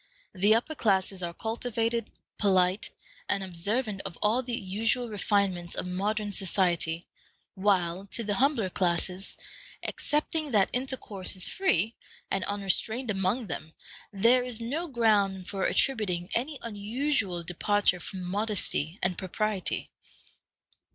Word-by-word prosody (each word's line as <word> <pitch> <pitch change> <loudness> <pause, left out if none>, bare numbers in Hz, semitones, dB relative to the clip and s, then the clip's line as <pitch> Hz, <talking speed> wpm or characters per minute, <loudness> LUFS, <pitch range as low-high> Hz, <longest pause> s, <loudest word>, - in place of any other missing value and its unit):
The 205 +3 +5
upper 245 +7 0
classes 195 -7 +1
are 170 -1 -2
cultivated, 230 +3 -2 0.3
polite, 190 -1 +3 0.4
and 200 -1 +2
observant 200 +4 -1
of 185 -4 -6
all 220 +4 +3
the 245 -2 -3
usual 225 +5 0
refinements 195 -4 0
of - - -2
modern 205 +3 -1
society, 175 -4 0 0.5
while 190 -1 +1
to 230 - 0
the 210 -1 0
humbler 265 -9 +2
classes, 180 +1 0 0.5
excepting 305 +1 -1
that 200 -3 +4
intercourse 250 -7 -2
is 185 - +5
free 225 - +1 0.3
and 195 -1 +1
unrestrained 210 +4 +1
among 195 +5 0
them, 160 -3 -6 0.4
there 230 +5 +4
is 245 -2 -1
no 285 +10 -2
ground 205 - +2
for 195 -1 -2
attributing 190 -9 +1
any 275 +5 -1
unusual 215 -3 -1
departure 180 +2 +2
from 185 +2 -6
modesty 190 -4 -1
and 180 -1 +1
propriety. 195 +1 -2
205 Hz, 125 wpm, -29 LUFS, 185-230 Hz, 0.5 s, The